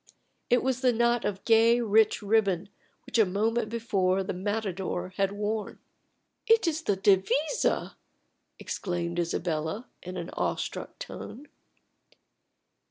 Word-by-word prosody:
It 245 Hz, -, +3 dB
was 260 Hz, -1 st, 0 dB
the 255 Hz, -2 st, +4 dB
knot 235 Hz, 0 st, +2 dB
of 195 Hz, -1 st, -3 dB
gay, 230 Hz, +1 st, +5 dB
rich 220 Hz, -1 st, +3 dB
ribbon 200 Hz, -3 st, +1 dB, 0.4 s
which -, -, -1 dB
a -, -, +8 dB
moment 215 Hz, +4 st, 0 dB
before 195 Hz, -5 st, 0 dB
the 190 Hz, -, -3 dB
matador 190 Hz, -2 st, -3 dB
had 195 Hz, +1 st, 0 dB
worn. 210 Hz, +1 st, -3 dB, 0.7 s
"It 450 Hz, -2 st, +5 dB
is 320 Hz, -1 st, 0 dB
the 205 Hz, -10 st, +1 dB
devisa!" 200 Hz, -, +2 dB, 0.6 s
exclaimed 175 Hz, -2 st, -3 dB
Isabella, 170 Hz, +4 st, -2 dB, 0.2 s
in 180 Hz, +1 st, -7 dB
an 175 Hz, -1 st, -5 dB
awestruck -, -, -3 dB
tone. 280 Hz, +6 st, -9 dB
205 Hz, 120 wpm, -28 LUFS, 185-235 Hz, 0.7 s, a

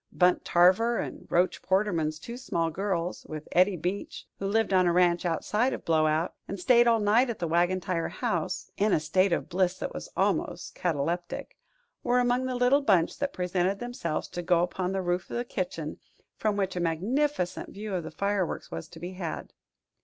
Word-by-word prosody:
Bunt 180 Hz, 0 st, +3 dB
Tarver 190 Hz, +7 st, +4 dB
and -, -, -5 dB
Roach 180 Hz, +2 st, +2 dB
Porterman's 180 Hz, -6 st, +1 dB
two 235 Hz, +9 st, -8 dB
small 165 Hz, -9 st, -1 dB
girls, 180 Hz, -1 st, -2 dB
with 155 Hz, -1 st, -7 dB
Eddie 185 Hz, +1 st, +4 dB
Beach, 180 Hz, +5 st, -4 dB
who 195 Hz, -, -2 dB
lived 220 Hz, 0 st, +1 dB
on 185 Hz, -1 st, +4 dB
a -, -, +4 dB
ranch 175 Hz, 0 st, +3 dB
outside 215 Hz, +9 st, 0 dB
of -, -, -6 dB
Blowout 155 Hz, +1 st, +2 dB
and 195 Hz, -, -5 dB
stayed 240 Hz, +5 st, +5 dB
all 230 Hz, -1 st, +4 dB
night 220 Hz, +5 st, +3 dB
at 230 Hz, -, -3 dB
the 170 Hz, -, -2 dB
Wagon 175 Hz, +3 st, +2 dB
Tire 180 Hz, -3 st, -2 dB
House -, -, -3 dB
(in 205 Hz, +1 st, +2 dB
a -, -, +4 dB
state 185 Hz, +5 st, +2 dB
of -, -, 0 dB
bliss 185 Hz, 0 st, +1 dB
that -, -, -4 dB
was -, -, -7 dB
almost -, -, 0 dB
cataleptic), 175 Hz, +1 st, -2 dB, 0.5 s
were 245 Hz, 0 st, +2 dB
among 245 Hz, +1 st, +1 dB
the 255 Hz, -, -2 dB
little 250 Hz, +3 st, +4 dB
bunch 190 Hz, -11 st, +2 dB
that 280 Hz, 0 st, -1 dB
presented 180 Hz, 0 st, 0 dB
themselves 220 Hz, -9 st, -3 dB
to 175 Hz, -, -4 dB
go 175 Hz, 0 st, +3 dB
upon 180 Hz, +1 st, -2 dB
the 190 Hz, -1 st, -1 dB
roof 175 Hz, +1 st, -1 dB
of -, -, -3 dB
the 240 Hz, -, -2 dB
kitchen, 175 Hz, -8 st, -4 dB, 0.4 s
from 210 Hz, -2 st, 0 dB
which 195 Hz, -2 st, -1 dB
a -, -, -1 dB
magnificent 185 Hz, -, -1 dB
view 210 Hz, 0 st, -6 dB
of 180 Hz, -2 st, -1 dB
the 160 Hz, -, -6 dB
fireworks 200 Hz, -2 st, -2 dB
was 160 Hz, -, -5 dB
to 165 Hz, 0 st, -13 dB
be 175 Hz, +2 st, -6 dB
had. 180 Hz, -3 st, -5 dB
185 Hz, 195 wpm, -28 LUFS, 170-210 Hz, 0.5 s, stayed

